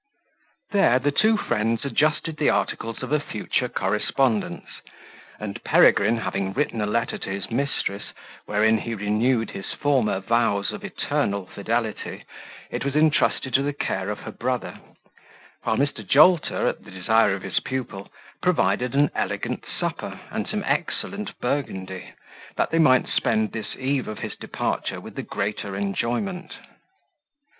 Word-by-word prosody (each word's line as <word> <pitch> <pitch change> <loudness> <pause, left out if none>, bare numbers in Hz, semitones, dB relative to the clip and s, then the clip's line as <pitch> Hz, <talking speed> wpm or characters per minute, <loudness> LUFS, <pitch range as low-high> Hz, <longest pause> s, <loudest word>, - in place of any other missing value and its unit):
There 195 - +5
the 140 +3 +1
two 215 +8 +4
friends 115 - 0
adjusted 155 +2 +1
the 150 - +3
articles 115 0 -1
of - - -5
a 150 - +4
future 125 -1 -2
correspondence; 105 +4 0 0.7
and 105 -2 -6
Peregrine, 110 +4 +5
having 100 -3 -2
written 125 -4 0
a 105 - 0
letter 115 +2 0
to - - -5
his 100 +3 -4
mistress, 120 -6 -1 0.4
wherein 110 +2 +3
he 115 +1 -4
renewed 110 +3 +1
his 95 - -6
former 130 -9 +2
vows 115 -1 +1
of - - -7
eternal 100 -1 -1
fidelity, 110 +3 -3 0.5
it - - -2
was 140 0 -2
intrusted 150 -3 +3
to 135 - +5
the 145 +1 -1
care 95 -8 -2
of 105 - -4
her - - -7
brother, 125 +1 -3 0.9
while 110 - +1
Mr. 140 -6 0
Jolter, 155 - +5
at - - -2
the - - -13
desire 100 +2 +3
of 95 - -8
his 95 - 0
pupil, 125 -7 -5 0.3
provided 125 - +2
an 145 0 +4
elegant - - -2 0.2
supper, - - -3
and - - -2
some - - -2
excellent - - -2
Burgundy, 95 -9 -3 0.4
that - - 0
they 165 - +2
might 130 -5 +5
spend 110 -1 +1
this 110 - -5
eve 135 0 -1
of 110 - -5
his - - -5
departure - - -3
with - - -10
the - - -4
greater 100 -1 -3
enjoyment. 120 - -2
115 Hz, 150 wpm, -24 LUFS, 105-140 Hz, 0.9 s, There